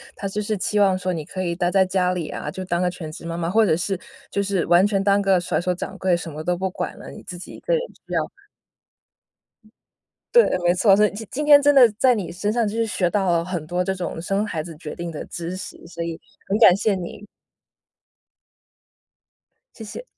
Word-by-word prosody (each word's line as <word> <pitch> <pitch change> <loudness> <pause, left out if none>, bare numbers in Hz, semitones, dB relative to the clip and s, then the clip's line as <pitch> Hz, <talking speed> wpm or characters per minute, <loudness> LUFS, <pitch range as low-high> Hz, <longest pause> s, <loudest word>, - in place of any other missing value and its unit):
他 200 - -4
就 205 +2 -3
是 210 0 -2
期 210 +2 0
望 195 -2 +4
说 185 0 -2
你 160 -3 -4
可 185 - -5
以 170 -1 -1
待 175 0 0
在 190 -1 +4
家 185 -1 +1
里 175 -4 -4
啊， 150 - -5
就 185 +5 -6
当 175 -1 -1
个 180 - +2
全 160 -3 -7
职 160 - -10
妈 170 0 -4
妈， 170 0 -2
或 220 +3 +4
者 165 - +3
是 190 +2 -2 0.3
就 200 - 0
是 195 -3 0
完 175 +3 +5
全 195 -2 +1
当 200 0 +3
个 195 -2 +3
甩 175 - -1
手 180 +1 0
掌 - - -6
柜， 185 -2 +2
什 170 -1 -5
么 155 +1 -7
都 180 +2 0
不 190 +2 -2
管 180 0 -5
了， - - -10
你 - - -11
自 180 - -8
己 180 - -10
一 - - -11
个 - - -1
人 480 - +2 0.3
需 - - -7
要 - - +2 2.1
对， 475 - +8 0.2
没 175 - +5
错， 195 +1 +5
所 210 - +5
以 - - 0
今 220 +1 -7
今 295 +3 -2
天 290 -1 +8
真 290 0 +5
的 255 -4 +8
在 255 0 +5
你 200 -8 -3
身 185 +4 -2
上 230 -1 +1
就 205 - -4
是 230 0 +1
学 180 -5 0
到 195 -1 +1
了 170 0 +1
很 175 -4 -4
多 180 +3 -1
这 190 - -1
种 175 -2 -4
生 195 +4 0
孩 160 -7 -3
子 165 0 -9
决 150 -1 -7
定 170 0 -5
的 155 - -6
知 170 +2 -5
识， 185 - -8
所 170 -1 -5
以 165 -1 -5 0.3
很 200 - +1
感 185 -6 +8
谢 200 0 +1
你。 185 +3 -7 2.5
谢 225 - -9
谢。 215 - -8
185 Hz, 260 characters per minute, -22 LUFS, 175-205 Hz, 2.5 s, 对